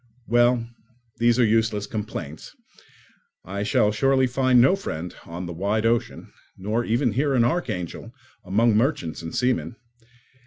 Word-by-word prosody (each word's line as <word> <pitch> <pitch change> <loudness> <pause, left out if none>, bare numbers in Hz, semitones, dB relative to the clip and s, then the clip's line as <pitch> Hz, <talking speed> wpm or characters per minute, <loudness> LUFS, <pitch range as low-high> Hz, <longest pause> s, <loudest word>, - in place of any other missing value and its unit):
Well, 120 0 +2 0.5
these 120 0 +3
are 125 - +4
useless 110 -2 +1
complaints; 100 -8 -7 0.9
I 100 +2 -5
shall 105 0 +2
certainly 135 +3 +2
find 130 0 +3
no 135 +10 +5
friend 85 - -6
on 85 +2 -6
the 85 - -6
wide 100 +6 -1
ocean, 115 0 -1 0.2
nor 105 +5 -1
even 120 +2 +1
here 140 +3 +1
in 120 - +4
Archangel, 120 - -3 0.3
among 110 +3 +2
merchants 110 - 0
and 80 - -7
seamen. 125 -1 0
115 Hz, 140 wpm, -24 LUFS, 100-125 Hz, 0.9 s, no